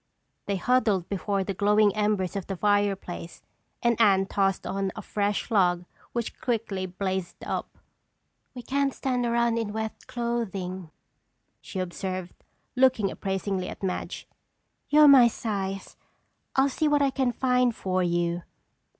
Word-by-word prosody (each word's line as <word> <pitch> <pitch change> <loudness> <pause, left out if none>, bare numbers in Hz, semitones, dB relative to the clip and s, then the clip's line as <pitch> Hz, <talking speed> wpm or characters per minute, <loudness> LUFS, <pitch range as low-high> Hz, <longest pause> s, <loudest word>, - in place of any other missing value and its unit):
They 200 - 0
huddled 210 -3 +2
before 200 0 -1
the 195 - -3
glowing 205 +1 +3
embers 210 -3 0
of 195 -3 -4
the 195 - -3
fireplace 200 -4 -1 0.4
and 235 -1 +2
Anne 195 -3 +5
tossed 195 -1 0
on 195 0 -2
a 215 - -6
fresh 205 +3 -1
log 180 -4 +3 0.3
which 235 -1 -4
quickly 215 -6 -1
blazed 185 -1 -4
up. - - -4 0.8
"We 245 - -7
can't 275 +2 0
stand 250 -2 -1
around 235 0 +2
in 210 -2 -3
wet 220 0 -5
clothing," 195 -7 -3 0.7
she - - -8
observed, 185 0 -4 0.4
looking 250 -6 +3
appraisingly 195 -1 -2
at - - -9
Madge. 185 -1 -3 0.6
"You're 300 0 +7
my 265 -4 +9
size. 195 -4 -4 0.6
I'll 270 +1 +4
see 300 +3 0
what 295 -1 +3
I 275 - +2
can 260 -2 +1
find 250 -1 +2
for 185 -1 -1
you." 175 0 0
205 Hz, 140 wpm, -27 LUFS, 190-235 Hz, 0.8 s, my